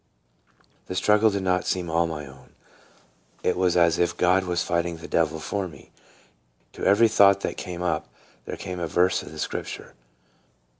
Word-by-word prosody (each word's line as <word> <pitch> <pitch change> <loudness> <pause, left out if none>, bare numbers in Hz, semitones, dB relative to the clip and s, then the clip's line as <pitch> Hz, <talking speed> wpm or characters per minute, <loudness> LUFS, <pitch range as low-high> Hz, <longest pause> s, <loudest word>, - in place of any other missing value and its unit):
The 95 - -5
struggle 105 +3 +4
did 100 -2 -2
not 90 -1 0
seem 90 -2 -1
all 85 +1 +1
my 75 -3 -5
own; 65 -1 -16 0.9
it - - +1
was 90 -1 +1
as 85 -1 +3
if 85 - +1
God 95 +1 +3
was 90 -1 -1
fighting 85 0 -1
the 80 - -10
devil 80 -1 0
for 100 +3 -3
me. 75 -5 -15 0.8
To - - -9
every 105 +4 +5
thought 100 -2 +5
that - - -3
came 90 -2 -6
up 80 -3 -1 0.4
there - - -6
came 90 -1 -6
a 85 - -2
verse 90 +3 +2
of - - -11
the 80 - -10
Scripture. - - -5
90 Hz, 180 wpm, -25 LUFS, 80-95 Hz, 0.9 s, every